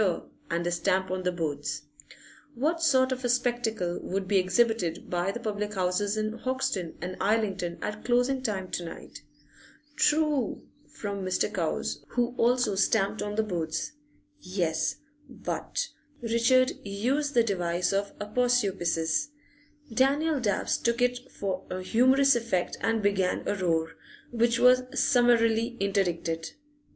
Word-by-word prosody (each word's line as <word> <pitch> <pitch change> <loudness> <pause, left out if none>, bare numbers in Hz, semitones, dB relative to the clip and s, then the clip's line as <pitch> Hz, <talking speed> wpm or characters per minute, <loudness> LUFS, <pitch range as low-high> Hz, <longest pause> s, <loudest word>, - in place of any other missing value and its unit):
and 170 +1 -1
a 175 - 0
stamp 190 +1 0
on 185 0 -1
the 180 0 0
boards). 150 -4 -3 0.7
What 315 +7 0
sort 260 -5 +4
of 260 0 -3
a 245 - 0
spectacle 240 -7 0
would 190 0 -3
be 195 0 +4
exhibited 185 -3 +1
by 180 +2 0
the 235 - -5
public 210 -2 -3
houses 190 +3 0
in 215 +1 -2
Hoxton 255 -10 -2
and 180 +2 -4
Islington 195 -5 0
at 210 +1 -4
closing 245 +2 +2
time 195 -7 -3
to 175 - -2
night? 165 - -9 0.7
['True!' 300 -7 +1 0.2
from 200 -2 -5
Mr. 185 +3 0
Cowes, 75 - -2
who 245 0 -1
also 245 -2 +3
stamped 200 +1 +1
on 210 0 -3
the 220 - +2
boards.) 165 - -3 0.5
Yes, 170 - -1 0.3
but - - -3 0.3
Richard 235 +2 +3
used 255 +9 -1
the 235 - +6
device 180 -4 0
of 200 +1 -2
aposiopesis; 205 - +1 0.7
Daniel 285 +5 +2
Dabbs 205 -6 0
took 235 +1 0
it 245 +1 0
for 190 -2 -3
a 185 0 -4
humorous 260 +6 +4
effect 230 -7 -1
and 225 -1 +1
began 195 -2 +1
a - - +1
roar, 165 -4 0 0.4
which 235 0 +2
was 250 0 +6
summarily 240 -3 +3
interdicted. 175 -5 -1
210 Hz, 135 wpm, -28 LUFS, 185-245 Hz, 0.7 s, the